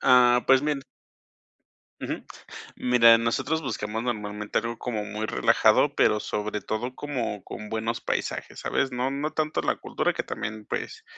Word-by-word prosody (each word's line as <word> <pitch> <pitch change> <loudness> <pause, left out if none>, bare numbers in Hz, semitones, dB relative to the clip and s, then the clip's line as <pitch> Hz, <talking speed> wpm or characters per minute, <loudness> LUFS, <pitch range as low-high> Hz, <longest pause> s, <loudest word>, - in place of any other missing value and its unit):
Ah, 125 -1 +6
pues, 135 0 +6
mien 150 -2 0 1.2
Ujú, - - -4 0.5
mira, 115 -2 +6
nosotros 130 +8 0
buscamos 110 -4 -3
normalmente 105 -3 -2
algo 115 0 -4
como 110 -4 -3
muy 105 +1 -4
relajado, - - +3
pero 105 - +3
sobre 105 0 -3
todo 115 +5 -3
como 125 -8 -4
con 105 - -8
buenos 110 +1 -2
paisajes, - - -3
¿sabes?, 135 - 0
no 125 +1 -1
no 140 +3 -2
tanto 155 -1 0
la - - 0
cultura - - -1
que - - -2
también, 110 0 -5
pues, - - -4
115 Hz, 150 wpm, -26 LUFS, 105-130 Hz, 1.2 s, Ah